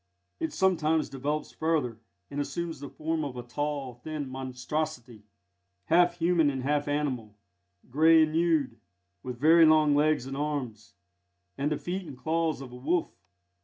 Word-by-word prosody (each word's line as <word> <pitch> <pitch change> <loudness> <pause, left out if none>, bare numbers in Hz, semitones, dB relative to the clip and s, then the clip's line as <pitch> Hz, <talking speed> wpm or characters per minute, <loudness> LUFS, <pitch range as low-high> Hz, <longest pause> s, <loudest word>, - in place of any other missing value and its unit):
It 160 - -2
sometimes 160 -4 +1
develops 145 +3 -3
further, 150 -8 -1 0.3
and 145 - -2
assumes 160 +2 -4
the 140 0 -7
form 160 0 -2
of 135 -4 -5
a 120 - -5
tall, 140 +1 -3
thin 145 +4 -6
monstrosity, 125 -3 -4 0.6
half 175 0 +4
human 170 -3 +3
and 135 -2 -3
half 145 +1 0
animal, 130 -8 -2 0.5
grey 160 +5 +5
and 155 - 0
nude, 160 -7 +1 0.4
with 125 -1 -6
very 165 +4 +6
long 155 -1 +5
legs 150 -3 +2
and 135 0 -5
arms, 135 -8 -4 0.6
and 145 +2 -1
the 150 - 0
feet 180 0 -4
and 140 -4 -9
claws 160 0 -1
of 130 -2 -9
a - - -10
wolf. 160 +7 -1
150 Hz, 155 wpm, -28 LUFS, 130-160 Hz, 0.6 s, very